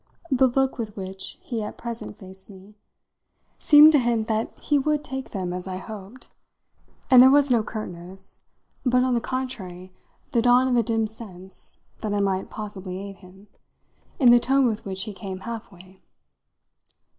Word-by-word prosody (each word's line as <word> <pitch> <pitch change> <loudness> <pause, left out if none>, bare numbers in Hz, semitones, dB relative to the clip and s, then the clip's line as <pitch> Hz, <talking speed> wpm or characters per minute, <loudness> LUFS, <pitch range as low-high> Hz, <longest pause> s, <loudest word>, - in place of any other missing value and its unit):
The 260 0 +5
look 265 +1 0
with 215 -3 -5
which 190 0 -4
he 230 -3 -3
at 210 - -6
present 235 -3 -6
faced 190 0 -11
me 195 +1 -14 0.9
seemed 300 +1 +8
to 295 - +5
hint 235 -3 0
that 220 0 -2
he 295 -1 +1
would 300 +1 0
take 265 -3 -6
them 185 -3 -4
as 180 +1 -6
I 185 -1 -4
hoped, 210 +5 -10 0.8
and 255 -1 +10
there 260 - +9
was 285 0 +4
no 235 -2 +4
curtness, 190 -3 -8 0.4
but 250 -1 +3
on 255 -1 +1
the 235 - +1
contrary 190 -9 -5 0.4
the 235 - +2
dawn 245 +2 +5
of 250 - +1
a 240 - +4
dim 225 0 0
sense 190 -4 -10 0.2
that 210 -1 -2
I - - +1
might 195 -1 0
possibly 195 -3 -7
aid 195 0 -8
him, 190 +2 -17 0.7
in 250 -4 +6
the 240 - +7
tone 270 +2 +2
with 220 -3 -1
which 190 -1 -3
he 215 -1 -6
came 190 -1 -7
half 230 0 -7
way. 185 +1 -17
220 Hz, 175 wpm, -24 LUFS, 190-250 Hz, 0.9 s, and